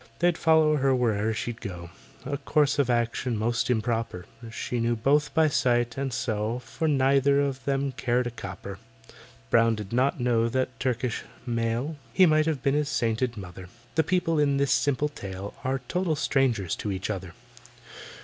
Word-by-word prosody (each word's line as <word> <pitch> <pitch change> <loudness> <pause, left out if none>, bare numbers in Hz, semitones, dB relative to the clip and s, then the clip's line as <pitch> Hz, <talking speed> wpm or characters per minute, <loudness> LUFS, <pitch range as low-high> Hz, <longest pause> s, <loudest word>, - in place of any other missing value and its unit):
They'd 175 0 +2
follow 160 -2 +4
her 135 -1 +2
where'er 110 -3 +1
she'd 115 +1 -4
go— 85 -5 -7 0.3
A 140 +1 -2
course 145 -2 +1
of 135 -3 +2
action 120 0 0
most 115 +3 0
improper; 115 -6 -1 0.3
She 120 +1 -3
neither 115 0 0
knew 145 +2 +7 0.2
by 160 -1 +5
sight, 120 -5 +1
and 135 -1 -2
so 115 -1 -1
For 125 +6 -4
neither 140 0 +3
of 135 -2 -1
them 140 0 0
cared 125 -1 0
a 120 - -3
copper. 100 -3 -8 0.7
BROWN 115 -1 +4
did 105 0 -7
not 130 +3 +2
know 115 -2 +2
that 130 0 -2
Turkish 125 -2 -1 0.2
male, 120 +5 -1 0.2
He 190 - +6
might 155 -1 +3
have 150 -5 -1
been 140 -1 +2
his 150 0 0
sainted 115 -1 0
mother: 90 -2 -9 0.2
The 160 - +3
people 165 -1 +1
in 140 -2 +2
this 140 -1 +1
simple 145 +1 +2
tale 100 -6 -7
Are 130 0 -1
total 180 -1 0
strangers 125 - +1
to 105 - -3
each 95 +2 -3
other. 95 -4 -6
125 Hz, 170 wpm, -26 LUFS, 115-140 Hz, 0.7 s, knew